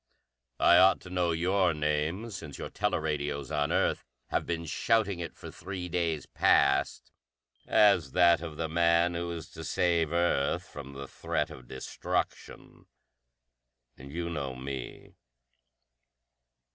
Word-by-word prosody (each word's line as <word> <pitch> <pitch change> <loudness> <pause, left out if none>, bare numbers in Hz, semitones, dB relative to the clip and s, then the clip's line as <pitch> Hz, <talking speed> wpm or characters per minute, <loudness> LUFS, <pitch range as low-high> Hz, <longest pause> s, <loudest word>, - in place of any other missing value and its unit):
"I 85 - +6
ought 95 +1 +6
to 90 - -11
know 90 -1 +1
your 90 +1 +2
name, 75 +9 -1
since 80 -8 -8
your - - -6
teleradios 75 -8 -2
on 75 0 0
Earth - - +1 0.3
have - - -1
been 85 -1 -2
shouting 100 +2 +1
it 85 -2 -6
for - - -10
three 90 -2 -6
days 80 -4 -1
past 70 +1 +2 0.6
as 100 -5 +4
that 85 -2 +5
of 80 -3 -7
the 80 - -2
man 85 +1 +3
who 85 0 -3
is 85 0 -6
to 80 - -9
save 85 -2 +1
Earth 85 -5 +1
from 70 -1 -9
the 70 0 -7
threat - - -2
of 65 -2 -12
destruction. 65 +1 -5 1.1
And 70 +1 -12
you 85 +2 -3
know 70 -5 -4
me!" 65 -1 -7
85 Hz, 135 wpm, -29 LUFS, 75-90 Hz, 1.1 s, I